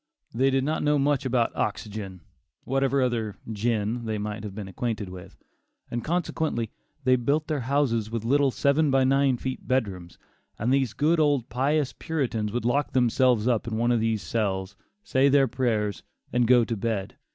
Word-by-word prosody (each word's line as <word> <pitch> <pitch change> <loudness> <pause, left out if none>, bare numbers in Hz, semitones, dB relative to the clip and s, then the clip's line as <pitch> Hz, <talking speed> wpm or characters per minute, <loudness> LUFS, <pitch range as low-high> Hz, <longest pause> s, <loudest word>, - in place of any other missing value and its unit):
They 130 +4 +3
did 135 0 +1
not 155 +3 -1
know 150 0 +2
much 140 -1 +1
about 120 -2 +1
oxygen, 100 -4 -4 0.4
whatever 135 0 +1
other 115 -4 -1 0.2
"gin" 110 +1 -1
they 110 -1 -1
might 105 0 -4
have 100 -2 -7
been 105 -2 -6
acquainted 105 0 -3
with; 90 -1 -11 0.5
and 120 0 -3
consequently, 160 - -1 0.3
they 130 0 +4
built 140 +5 0
their 155 -2 -1
houses 125 -4 0
with 115 -1 -4
little 140 +3 +3
seven 140 +3 +2
by 135 -1 +3
nine 135 -1 +3
feet 130 +1 -5
bedrooms, 100 -9 -2 0.4
and 120 +5 +1
these 135 -5 +1
good 160 +3 +2
old 145 -5 +2
pious 135 +5 0
Puritans 120 -9 -2
would 120 +1 -2
lock 140 +4 +1
themselves 125 -2 +3
up 120 -2 +1
in 110 -1 -2
one 120 +1 +2
of 120 - +3
these 110 -3 0
cells, 95 0 -2 0.3
say 135 -9 +3
their 140 -1 +4
prayers, 110 -6 -1 0.3
and 120 -1 +3
go 120 -1 +5
to 115 - -2
bed. 100 -2 -3
120 Hz, 175 wpm, -26 LUFS, 110-135 Hz, 0.5 s, go